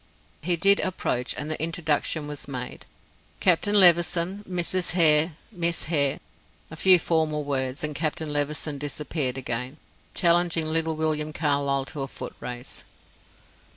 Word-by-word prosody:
He 175 +3 0
did 195 +4 +6
approach, 125 -9 -2
and 150 +1 -4
the 155 - -2
introduction 160 -2 -1
was 145 -1 -6
made: 125 -3 -7 0.5
"Captain 205 +4 +3
Levison, 175 +2 +4
Mrs. 180 0 -1
Hare 160 -2 +4 0.2
and 190 - -17
Miss 170 0 +1
Hare." 145 -4 +1 0.5
A - - -8
few 185 +3 +6
formal 160 -3 -1
words, 135 -1 -3
and 150 0 -1
Captain 155 0 -3
Levison 145 0 -2
disappeared 145 -2 -3
again, 125 +2 -4 0.4
challenging 170 -2 +2
little 160 0 -1
William 155 -1 -2
Carlyle 140 -3 -1
to 145 - -6
a 135 - -3
foot - - -9
race. 125 +1 -6
155 Hz, 140 wpm, -24 LUFS, 145-170 Hz, 0.5 s, did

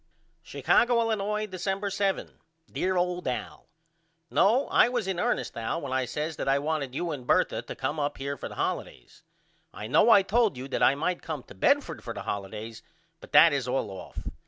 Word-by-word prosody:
Chicago, 240 0 +2
Illinois, 215 -2 0
December 195 +1 -3
7. 195 0 -2 0.3
DEAR 185 0 0
OLD 180 0 -1
AL: 125 - -5 0.6
No 235 +8 +3
I - - +5
was 240 -5 -2
in 190 -2 -2
ernest 240 +5 -1
Al 115 +7 -2
when 140 -5 -5
I 130 -1 +1
says 150 +5 -4
that - - -4
I 135 +1 +4
wanted 145 -3 -2
you 175 +2 -2
and 130 -5 -7
Bertha - - +2
to - - -8
come 145 +4 -3
up 145 0 -2
here 140 +1 -3
for - - -7
the - - -10
holidays. - - -4 0.5
I 105 - -8
know 130 - +4
I 200 -4 +7
told 215 - +2
you 130 +2 -6
that - - -2
I 135 - +5
might 175 +5 -2
come 155 -5 -5
to - - -14
Bedford 95 - +1
for - - -6
the - - -6
holidays 105 +3 -5 0.4
but - - -14
that 165 -2 +8
is 135 -3 -1
all 125 -5 -1
off. 95 - -8
160 Hz, 200 wpm, -27 LUFS, 130-195 Hz, 0.6 s, that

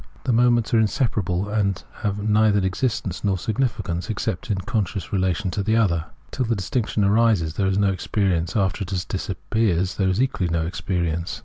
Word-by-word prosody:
The 130 - +1
moments 120 0 +3
are 115 - +5
inseparable, 105 - 0
and 100 -3 0
have 105 -1 -2
neither 105 -1 +4
existence 95 -2 -2
nor 100 -2 +1
significance 105 -3 -2
except 110 -1 -3
in 100 - +1
con 110 +1 0
scious 95 +1 -6
relation 95 0 0
to 100 - -2
each 110 +3 +2
other. 85 -8 +2 0.3
Till 130 - -1
the 115 0 0
distinction 105 +2 -1
arises 100 -6 +3
there 95 +3 0
is 95 0 +1
no 100 -1 +3
experience, 95 -1 -1
after 95 -1 +1
it 90 -2 -2
disappears 95 0 -1
there 95 -2 +2
is 95 +3 0
equally 125 -9 0
no 85 -1 0
experience. 85 +1 -2
100 Hz, 180 wpm, -23 LUFS, 90-110 Hz, 0.3 s, are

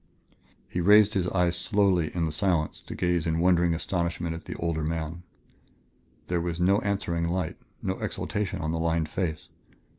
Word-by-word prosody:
He 90 - -2
raised 105 +3 +6
his 95 -3 +1
eyes 90 -2 +1
slowly 95 -5 +2
in 85 -2 +1
the 80 - -2
silence 85 -1 0
to - - -6
gaze 90 -1 0
in 80 0 +1
wondering 85 -1 +3
astonishment 85 -1 -2
at 80 - -8
the - - -6
older 85 -2 -1
man. 80 +1 -3 1.0
There 90 -1 -1
was 85 0 -3
no 95 +3 +4
answering 95 -5 -1
light, 90 -1 -2 0.3
no - - -2
exaltation 105 -4 -3
on 80 0 -1
the 80 - -1
lined 80 -1 0
face. 80 -4 -3
85 Hz, 170 wpm, -27 LUFS, 80-90 Hz, 1.0 s, raised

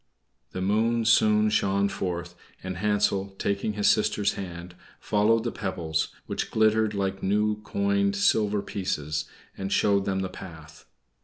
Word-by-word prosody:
The 95 - -4
moon 115 +3 +1
soon 105 -1 +4
shone 100 -1 +2
forth, 90 -3 -4 0.3
and 95 -1 -5
Hansel, 100 -1 0
taking 100 +1 -1
his 105 -1 +1
sister's 105 -1 +2
hand, 90 -2 -7 0.3
followed 110 +2 +2
the 120 - -2
pebbles, 85 -5 -2 0.2
which - - -3
glittered 110 -1 +2
like 95 -1 -2
new 105 +2 +1
coined 200 - 0
silver 105 - +2
pieces, 75 -6 -3 0.3
and 95 0 -5
showed 100 -1 +2
them 95 -1 -1
the 95 - -2
path. 80 -3 -11
100 Hz, 140 wpm, -26 LUFS, 95-110 Hz, 0.3 s, soon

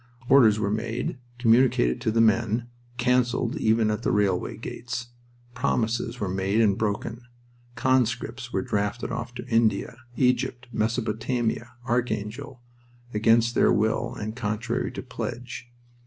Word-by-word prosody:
Orders 120 -6 +6
were 100 -1 0
made, 115 +4 -2 0.2
communicated 115 - +3
to 110 - +1
the 115 +1 +3
men, 115 +1 +2 0.3
canceled 125 -1 +1
even 110 -1 +2
at 105 +2 -2
the - - 0
railway 100 -5 +1
gates. 120 0 -6 0.4
Promises 120 -2 -1
were 100 - -1
made 95 +3 0
and 105 -4 +4
broken. 110 +3 -2 0.5
Conscripts 125 -1 0
were - - -1
drafted 105 -1 -2
off 120 +1 -5
to - - -6
India, 115 -2 +1 0.2
Egypt, 125 -1 +1
Mesopotamia, 115 +1 -1
Archangel, 120 +1 -2 0.5
against 115 +2 +3
their - - +4
will 110 +1 +1
and 110 +1 -5
contrary 110 -1 -2
to - - -6
pledge. 120 0 -6
115 Hz, 125 wpm, -26 LUFS, 110-125 Hz, 0.5 s, Orders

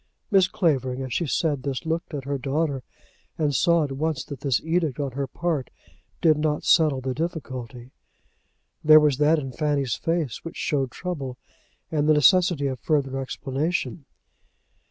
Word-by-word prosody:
Mrs. 190 -2 +4
Clavering 135 - 0
as 130 -3 -5
she 170 - 0
said 145 -1 0
this 140 +3 -4
looked 165 0 -2
at 140 - -4
her 140 0 -2
daughter, 140 +1 -1 0.6
and 150 -2 +1
saw 170 +5 +3
at 145 - -3
once 150 +2 -2
that 140 -4 -8
this 135 -4 +1
edict 160 -4 0
on 140 -2 -2
her 135 +2 -3
part 155 0 -2 0.5
did 155 -2 +4
not 150 -1 0
settle 150 -6 +4
the 130 0 -2
difficulty. 130 -7 -5 0.9
There 155 0 +9
was 150 -3 +2
that 150 +2 +4
in 135 -3 -4
Fanny's 140 -3 0
face 165 -7 -2
which 165 - -8
showed 135 -3 0
trouble 140 -6 -5 0.5
and 150 -1 +1
the 155 - +6
necessity 175 -1 +4
of 130 -2 -2
further 135 -4 0
explanation. 140 +4 -3
145 Hz, 160 wpm, -25 LUFS, 135-160 Hz, 0.9 s, There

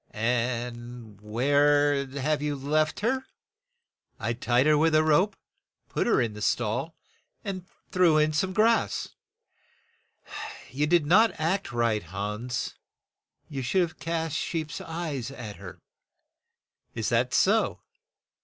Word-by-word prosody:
"And 120 -1 -3
where 145 +5 +3
have 140 +2 -1
you 150 -1 -1
left 155 +5 0
her?' 260 +5 +1 1.0
"I 115 +1 -1
tied 120 +2 +2
her 155 0 +5
with 160 +1 +3
a 155 - +5
rope, 170 +7 +3 0.5
put - - -1
her 235 - +4
in 115 -4 0
the 105 - -9
stall, 120 +9 -1 0.5
and 185 -4 -5 0.2
threw 175 -4 +4
in 155 0 +3
some 185 +5 0
grass." 225 +4 +2 1.6
"You 145 +3 0
did 170 -1 +3
not 215 +9 +4
act 170 -1 0
right, 115 -3 +1
Hans; 105 +7 -4 0.7
you 135 -3 -5
should 185 +10 +1
have 165 -1 -6
cast 165 -1 -2
sheep's 160 -1 -3
eyes 160 -7 -4
at 120 -7 -8
her." 95 -3 -11 1.1
"Is 110 - -1
that 120 +2 +2
so? 215 - +2
145 Hz, 125 wpm, -27 LUFS, 120-165 Hz, 1.6 s, her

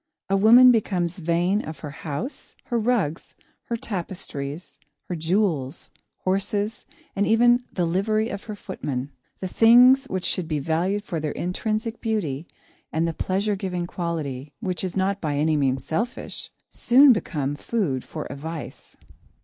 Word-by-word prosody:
A - - +4
woman 235 +5 +8
becomes 185 -5 0
vain 175 +5 +1
of 155 0 -8
her 150 - -6
house, 150 - -6
her 240 -2 -1
rugs, 215 -9 -1 0.3
her 235 - -2
tapestries, 170 -7 -6 0.3
her 180 - -3
jewels, 165 -4 -1 0.3
horses, 200 +3 -1 0.3
and 200 +1 +1
even 235 +2 +5 0.2
of - - -28
the 180 - +1
livery 215 +6 +1
of 200 -2 -6
her 215 - -6
footman. 145 -9 -5 0.3
The 190 - -2
things 245 +7 +6
which 190 -8 -3
should 180 -3 -1
be 155 -2 -1
valued 170 +8 0
for 170 -6 -3
their 150 -1 -2
intrinsic 215 +5 -2
beauty 170 - -2 0.4
and 160 +1 +1
the 165 - -2
pleasure 200 +5 0
giving 180 -3 -3
quality, 150 -6 -4
which 180 -2 -3
is 185 0 -3
not 195 +1 0
by 150 -3 -1
any 155 +2 +2
means 135 -3 0
selfish, 230 +10 -3 0.2
soon 265 +2 +6
become 145 - -2
food 150 - -1
for - - -6
a 135 - -6
vice. 160 +2 -8
185 Hz, 155 wpm, -24 LUFS, 155-215 Hz, 0.4 s, woman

